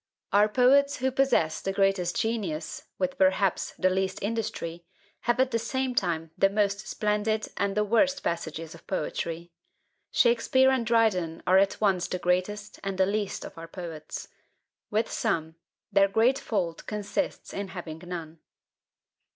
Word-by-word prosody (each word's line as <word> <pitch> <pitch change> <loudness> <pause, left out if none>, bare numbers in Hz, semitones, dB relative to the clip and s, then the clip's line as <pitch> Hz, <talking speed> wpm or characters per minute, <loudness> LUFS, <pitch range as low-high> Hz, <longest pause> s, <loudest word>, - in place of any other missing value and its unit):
Our 205 +1 +5
poets 275 +4 +4
who 260 +1 0
possess 245 -13 +2
the 195 - -1
greatest 195 -3 +1
genius, 200 -9 -2
with 185 -1 -2
perhaps 190 0 +2
the 185 0 +3
least 190 0 0
industry, 200 -6 -3 0.4
have 240 +1 +2
at 260 0 +3
the 230 - +1
same 260 +2 -1
time 165 -7 -1
the 195 - +4
most 200 0 0
splendid 210 +1 0
and 200 0 -1
the 210 - +4
worst 275 +7 +2
passages 165 -1 -3
of 165 - -15
poetry. 170 -1 -3 0.6
Shakspeare 255 +3 +4
and 250 -4 0
Dryden 200 -8 +2
are 185 +1 +6
at 195 0 +1
once 190 -4 +2
the 180 - -2
greatest 185 +4 -1
and 195 -1 -3
the 190 - +4
least 205 0 -2
of - - -10
our 165 - -8
poets. 165 -3 -7 0.6
With 215 +2 +1
some, 165 -8 -1 0.4
their 195 -1 +5
great 225 +7 +3
fault 175 -7 -2
consists 210 +7 -3
in 200 0 -3
having 170 -4 -7
none. 165 -3 -7
195 Hz, 150 wpm, -27 LUFS, 175-225 Hz, 0.6 s, are